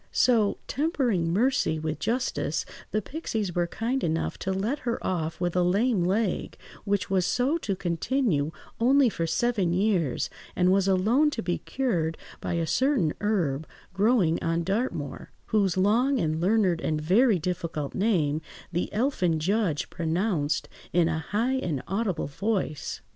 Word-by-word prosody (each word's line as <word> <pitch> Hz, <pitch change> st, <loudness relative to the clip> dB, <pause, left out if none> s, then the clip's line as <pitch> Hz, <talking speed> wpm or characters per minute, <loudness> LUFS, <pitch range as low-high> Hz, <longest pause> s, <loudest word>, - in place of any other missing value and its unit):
So, 225 Hz, -5 st, +3 dB
tempering 250 Hz, -, 0 dB
mercy 220 Hz, -, +2 dB
with 155 Hz, 0 st, -3 dB
justice, 245 Hz, +3 st, -1 dB, 0.2 s
the 215 Hz, -, -1 dB
pixies 220 Hz, -, -3 dB
were 175 Hz, 0 st, +1 dB
kind 240 Hz, +8 st, -2 dB
enough 165 Hz, 0 st, -1 dB
to 190 Hz, -, -2 dB
let 210 Hz, +10 st, -1 dB
her 235 Hz, -4 st, -2 dB
off 165 Hz, -3 st, -2 dB
with 175 Hz, -1 st, -1 dB
a 180 Hz, -, +3 dB
lame 200 Hz, +3 st, +2 dB
leg, 195 Hz, +2 st, 0 dB, 0.3 s
which 205 Hz, 0 st, 0 dB
was 190 Hz, -2 st, +3 dB
so 260 Hz, -, +1 dB
to 200 Hz, -10 st, -2 dB
continue 175 Hz, -, 0 dB, 0.3 s
only 260 Hz, +2 st, +5 dB
for 165 Hz, -5 st, -2 dB
seven 190 Hz, +1 st, +1 dB
years, 180 Hz, -, +1 dB, 0.3 s
and 180 Hz, 0 st, +3 dB
was 195 Hz, 0 st, +3 dB
alone 220 Hz, +11 st, +3 dB
to 245 Hz, -, -4 dB
be 175 Hz, 0 st, -1 dB
cured 170 Hz, -12 st, -1 dB, 0.2 s
by -, -, -3 dB
a 170 Hz, -1 st, 0 dB
certain 260 Hz, -, +2 dB
herb, 165 Hz, -9 st, 0 dB, 0.3 s
growing 195 Hz, -5 st, +2 dB
on 165 Hz, 0 st, 0 dB
Dartmoor, 195 Hz, -, -2 dB, 0.2 s
whose 195 Hz, -5 st, +1 dB
long 235 Hz, +8 st, +3 dB
and 160 Hz, -1 st, 0 dB
learned 185 Hz, -3 st, +2 dB
and 155 Hz, -1 st, -1 dB
very 200 Hz, +8 st, +4 dB
difficult 170 Hz, -4 st, -3 dB
name 165 Hz, -8 st, +1 dB, 0.3 s
the 175 Hz, +1 st, -2 dB
elfin 200 Hz, -, +1 dB
judge 185 Hz, -2 st, 0 dB
pronounced 165 Hz, -2 st, 0 dB, 0.2 s
in 170 Hz, -1 st, +3 dB
a 160 Hz, -1 st, -1 dB
high 225 Hz, -, 0 dB
and 160 Hz, -, -2 dB
audible 195 Hz, -2 st, -1 dB
voice. 165 Hz, -1 st, -2 dB
190 Hz, 150 wpm, -27 LUFS, 165-230 Hz, 0.3 s, only